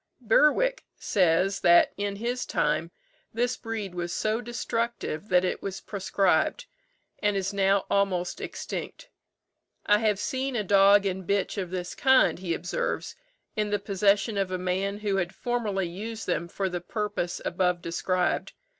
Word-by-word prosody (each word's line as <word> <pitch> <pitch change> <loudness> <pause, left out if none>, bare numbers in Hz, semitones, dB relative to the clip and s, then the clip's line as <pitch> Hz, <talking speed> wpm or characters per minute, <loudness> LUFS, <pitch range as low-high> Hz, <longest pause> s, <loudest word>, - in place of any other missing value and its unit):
Bewick 300 - +3
says 185 +1 +2
that 175 0 +5
in 200 0 -2
his 240 +4 -2
time 155 +3 0 0.4
this 245 +2 0
breed 220 -5 -5
was 175 -1 -3
so 215 +5 0
destructive 235 -6 -3
that 180 0 +4
it - - -2
was 195 -1 -4
proscribed, 200 - 0 0.5
and 205 -1 +1
is 195 +1 -2
now 195 0 +2
almost 190 -3 0
extinct. - - -6 0.8
"I 210 0 +4
have 215 -2 +2
seen 260 +5 -2
a 215 - 0
dog 200 +1 +5
and 190 -1 -3
bitch 200 -1 0
of 185 -2 -3
this 180 -1 -4
kind," 265 -8 +4
he 175 -3 -2
observes, 180 +3 -3 0.4
"in 210 -1 0
the 205 - +1
possession 200 +1 +1
of 195 -1 0
a 185 - -2
man 190 +2 -1
who 200 -2 0
had 175 -1 -2
formerly 215 -6 -1
used 215 +6 -6
them 170 - -1
for 190 +3 -2
the 180 -1 -4
purpose 205 -2 -3
above 180 -1 +1
described. 180 +2 -1
200 Hz, 155 wpm, -27 LUFS, 185-215 Hz, 0.8 s, that